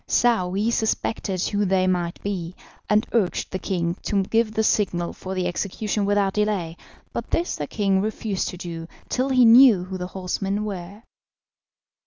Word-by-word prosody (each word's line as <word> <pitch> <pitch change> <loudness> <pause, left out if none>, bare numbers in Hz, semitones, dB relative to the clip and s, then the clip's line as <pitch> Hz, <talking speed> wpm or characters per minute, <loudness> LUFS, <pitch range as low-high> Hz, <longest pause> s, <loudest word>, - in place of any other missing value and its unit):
Saouy 210 -2 +2
suspected 220 -4 -1
who 205 0 0
they 190 -1 +2
might 175 -2 -1
be, 185 -3 -4 0.3
and 210 +2 +3
urged 210 -6 0
the 185 - -3
king 170 -2 -1
to 200 -2 0
give 225 +2 +1
the 220 0 0
signal 180 -5 +1
for 190 0 -6
the 185 -1 -1
execution 200 +3 -2
without 200 -1 +2
delay, 205 -6 -1 0.4
but - - -4
this 340 +1 0
the 145 - -4
king 195 -3 +1
refused 215 -1 -2
to 180 - -6
do 165 -2 -6 0.2
till 260 +2 0
he 255 -2 +5
knew 230 -5 +7
who 185 0 -6
the 180 - -3
horsemen 195 +2 -3
were. 200 +1 -7
195 Hz, 165 wpm, -23 LUFS, 180-215 Hz, 0.4 s, knew